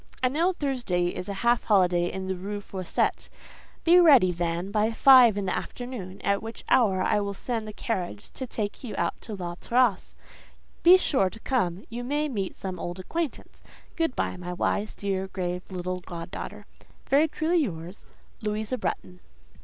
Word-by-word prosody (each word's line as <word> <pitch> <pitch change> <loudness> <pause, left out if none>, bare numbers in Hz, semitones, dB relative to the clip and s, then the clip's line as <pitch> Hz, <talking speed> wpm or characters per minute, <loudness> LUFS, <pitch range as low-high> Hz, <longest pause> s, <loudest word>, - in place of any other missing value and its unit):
I 255 - +4
know 330 +7 +2
Thursday 245 - -1
is 180 +2 -5
a - - -2
half 240 0 +3
holiday 180 -4 +3
in 190 0 -5
the 190 0 -2
Rue 200 +3 -5
Fossette: 190 -3 -2 0.5
be 345 +2 +7
ready, 275 - +7
then, 175 +2 -2
by 215 +1 +1
five 245 -4 +7
in 200 - -1
the 185 - 0
afternoon, 225 -7 -6
at 200 0 +1
which 225 0 -8
hour 195 -7 +4
I - - +2
will 200 -1 -3
send 225 0 -3
the - - -5
carriage 180 - -4
to 260 - -6
take 215 -1 -4
you 240 - -5
out - - 0
to 220 - -6
La 175 -3 -5
Terrasse. 240 -4 +1 0.7
Be 360 +2 +8
sure 260 - +2
to 225 - -12
come: 195 -8 -1
you 240 +1 -4
may 295 +4 0
meet 200 -7 -3
some 185 -2 -5
old 175 +2 -5
acquaintance. 320 - -4 0.3
Good 325 -6 0
by, - - -1
my 180 0 -5
wise, 205 +4 -1
dear, 195 -1 -2
grave 180 -1 -4
little 180 -1 -3
god 175 -1 -8
daughter.—Very 290 +4 -2
truly 320 +3 +1
yours, 180 - -4 0.4
"LOUISA 215 +4 -2
BRETTON." 180 0 -4
205 Hz, 175 wpm, -27 LUFS, 180-250 Hz, 0.7 s, Be